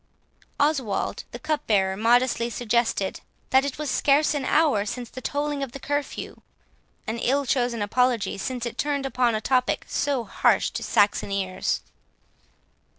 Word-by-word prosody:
11 290 0 +3
Oswald 205 -4 -3
the - - -7
cupbearer 205 -11 0
modestly 235 +2 +2
suggested, 235 -4 0 0.3
"that 265 +1 +5
it 280 -1 -3
was 300 -3 -3
scarce 290 +3 +3
an 285 -3 -2
hour 290 -11 +3
since 240 +2 -5
the 255 - -8
tolling 290 0 -2
of 270 -3 -4
the 275 - -7
curfew;" 290 +1 -4 0.6
an 225 +1 -3
ill 275 +4 +1
chosen 245 -4 0
apology, 245 +1 +1
since 245 +4 -4
it 235 - -6
turned 285 -2 0
upon 250 -3 +1
a - - 0
topic 255 0 +1
so 280 -4 0
harsh 205 - +2
to - - -4
Saxon 205 0 +2
ears. 190 -2 -1
250 Hz, 150 wpm, -25 LUFS, 225-280 Hz, 0.6 s, that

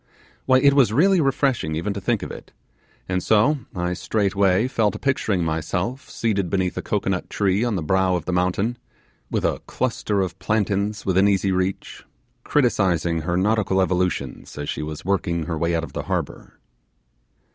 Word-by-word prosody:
Why, 130 -1 +6
it 140 +2 +5
was 135 -6 +4
really 180 - +4
refreshing 135 - 0
even 100 +6 -2
to 100 - -5
think - - 0
of - - -6
it; - - -10 0.6
and 90 0 -1
so 110 +10 +3 0.2
I 90 0 -1
straightway 100 +2 +1
fell 115 -5 +1
to - - -6
picturing 110 -9 0
myself 90 - -2
seated 100 -6 -1
beneath 95 -1 0
a - - -3
cocoanut - - -2
tree 100 +1 +1
on 120 -3 0
the 90 - -2
brow 95 +3 +2
of 85 - -3
the 90 - -2
mountain, 95 +7 0 0.5
with - - -1
a - - 0
cluster 110 -5 -1
of 90 0 -4
plantains 105 +1 -1
within 95 +1 +3
easy 100 -1 +2
reach, 95 +1 -2 0.4
criticizing 90 - +1
her 85 +2 -1
nautical 100 0 +1
evolutions 90 -10 -1
as 75 0 -4
she - - -3
was 75 +1 -6
working 85 -4 0
her 85 - -3
way 85 +2 0
out 80 - -1
of - - -8
the - - -3
harbour. - - -4
95 Hz, 175 wpm, -23 LUFS, 90-110 Hz, 0.6 s, Why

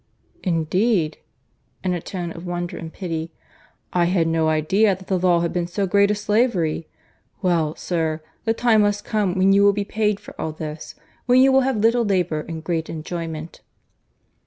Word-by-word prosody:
"Indeed! 175 0 +1 0.6
(in 185 -1 0
a 175 - -3
tone 175 -2 -5
of 170 +1 -9
wonder 175 -1 -4
and 165 -1 -7
pity,) 165 -3 -4 0.6
I 175 -1 +3
had 175 -1 +2
no 165 -1 +1
idea 190 +7 +2
that 190 - -14
the 185 -1 0
law 175 -1 +3
had 170 - -1
been 175 -1 -1
so 195 +3 -1
great 200 +2 +3
a 210 - +2
slavery. 205 -7 0 0.6
Well, 165 -4 +1
sir, 160 -3 -2 0.2
the 225 -1 +1
time 230 -2 +4
must 205 0 0
come 205 -4 0
when 190 +1 +4
you 200 0 +5
will 200 0 +6
be 205 0 -2
paid 210 -1 0
for - - -12
all 160 - -3
this, 155 0 -7 0.3
when 250 +1 +5
you 265 +1 +6
will 265 0 +5
have 265 -2 0
little 230 +3 +3
labour 180 -7 0
and 160 -1 -6
great 165 -1 -2
enjoyment." 165 0 -6
180 Hz, 180 wpm, -22 LUFS, 165-205 Hz, 0.6 s, will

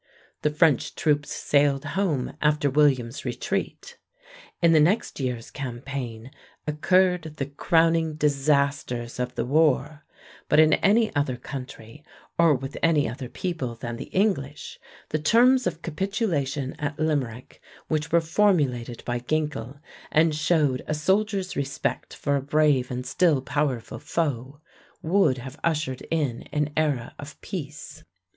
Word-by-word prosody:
The 150 - +2
French 150 -3 +2
troops 150 -2 +1
sailed 140 -1 +1
home 170 -10 -1
after 150 -2 +2
William's 135 -4 +2
retreat. 480 -1 -4 0.6
In 170 -1 +4
the 160 - +6
next 185 +8 +1
year's 125 -3 -3
campaign 125 -2 -6 0.3
occurred 170 +1 +2
the 135 - -1
crowning 160 +2 +2
disasters 140 -5 0
of 125 0 -3
the - - -1
war, 150 +1 +2 0.5
but - - +5
in 155 0 +6
any 220 +1 +3
other 145 -3 0
country 125 +1 -9 0.4
or 165 -3 +6
with 135 +2 -6
any 160 -3 +3
other 125 +2 -6
people 160 -10 -4
than 120 0 -6
the - - -6
English 170 -8 -1 0.3
the 155 - -1
terms 245 - +4
of 165 - -4
capitulation 155 - -2
at 145 -1 -3
Limerick, 135 -6 -2 0.3
which 155 0 -1
were 170 0 +4
formulated 150 - +1
by 120 0 -1
Ginkel 140 -1 -3 0.3
and 160 0 +4
showed 150 -4 +1
a 155 - -1
soldier's 195 +4 0
respect 140 -1 -3
for 140 - 0
a 140 - 0
brave 145 -2 +2
and 125 0 -4
still 165 -3 +2
powerful 130 -4 -2
foe, 140 -3 -3 0.4
would 170 -5 +3
have 130 +4 -9
ushered 155 -6 -1
in 145 -8 -1
an 150 0 0
era 145 -7 0
of 145 +1 -10
peace. 150 -5 -7
150 Hz, 135 wpm, -25 LUFS, 130-160 Hz, 0.6 s, the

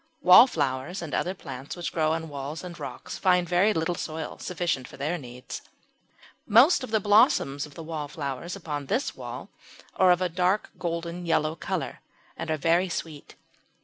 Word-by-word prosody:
Wallflowers 170 - +5
and 155 - -7
other 185 +2 -1
plants 135 -5 -8
which 175 -1 -4
grow 155 -1 +2
on 160 0 -3
walls 145 +2 -6
and 175 -2 -8
rocks 145 - -7
find 180 -2 +3
very 180 +5 +3
little 165 -2 0
soil 160 -2 -5
sufficient 170 -7 -2
for - - -13
their 155 +6 -2
needs. 125 -2 -8 0.9
Most 260 - +6
of 255 - -5
the 220 0 +2
blossoms 205 - +3
of 145 - -17
the 165 - -7
wallflowers 150 0 -5
upon 145 -3 -5
this 265 - -1
wall - - -7 0.5
are 185 - +5
of 180 0 +5
a 180 +2 +2 0.2
golden 170 0 -4
yellow 155 -1 +1
colour - - -4 0.4
and - - -6
are 155 - +1
very 170 +5 +2
sweet. 160 -3 -6
165 Hz, 165 wpm, -27 LUFS, 150-180 Hz, 0.9 s, Most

